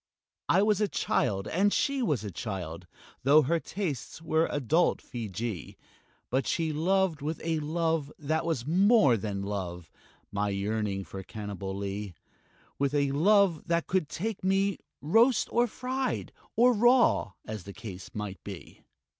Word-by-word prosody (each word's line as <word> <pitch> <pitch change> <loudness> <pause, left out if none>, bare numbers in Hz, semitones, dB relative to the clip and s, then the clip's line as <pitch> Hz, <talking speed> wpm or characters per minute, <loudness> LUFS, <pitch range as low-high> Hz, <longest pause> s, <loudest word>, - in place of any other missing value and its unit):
I 190 +4 +5
was 210 0 +2
a 210 - +3
child, 100 - 0
and 200 +4 +2
she 275 +3 +1
was 150 - 0
a 105 - -5
child 90 -4 -5 0.3
Tho' 145 +4 +6
her 165 +5 +1
tastes 160 - -4
were 160 0 +1
adult 150 +5 +2
Feejee 110 - -5 0.5
But 130 0 +1
she 160 -2 0
loved 175 0 +1
with 155 +3 -3
a 160 -1 0
love 160 -1 -1
that 155 +2 -1
was 160 -8 -1
more 185 - +5
than 100 -2 -3
love, 90 -5 -5 0.4
My 100 0 0
yearning 100 0 -2 0.2
Cannibalee; 100 -1 -5 0.6
With 140 +1 +1
a 140 -1 +2
love 185 +2 +3
that 170 0 +1
could 185 -5 0
take 205 +5 -4
me 195 +1 +1 0.2
roast 230 - +4
or 240 +1 +4
fried 255 +3 -3 0.2
Or 245 +2 +5
raw, 240 - +4
as 105 -4 -6
the 100 - -7
case 95 -5 -8
might 105 -2 -5
be. 95 -4 -9
150 Hz, 145 wpm, -29 LUFS, -, 0.6 s, Tho